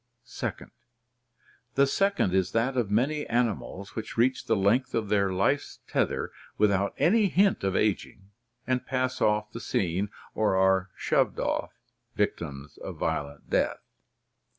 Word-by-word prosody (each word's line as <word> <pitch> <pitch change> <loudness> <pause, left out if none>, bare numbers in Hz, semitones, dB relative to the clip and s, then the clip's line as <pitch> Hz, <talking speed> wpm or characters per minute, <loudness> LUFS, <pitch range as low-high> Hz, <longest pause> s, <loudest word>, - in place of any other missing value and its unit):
(2) - - -3 1.2
The 140 - +5
second 195 - +1
is 95 -1 +1
that 120 +4 +1
of 120 -5 0
many 135 +8 +1
animals 115 -4 -2
which 110 - -6
reach 125 +3 +2
the 115 - +3
length 105 +6 +2
of 110 -3 -1
their 100 -2 +2
life's 100 +10 0
tether - - 0 0.3
without 100 -1 +2
any 210 +4 +4
hint 195 - +2
of 95 -1 0
ageing 100 -1 -1 0.3
and 130 0 -1
pass 130 -1 -1
off 105 0 +2
the 115 - -6
scene 95 -1 -1
— - - -23
or 105 -3 +1
are 95 0 +3
shoved - - +1
off - - -1 0.2
— - - -47
victims 70 +1 -3
of - - -7
violent 70 0 -3
death. - - +2
105 Hz, 150 wpm, -28 LUFS, 95-130 Hz, 1.2 s, The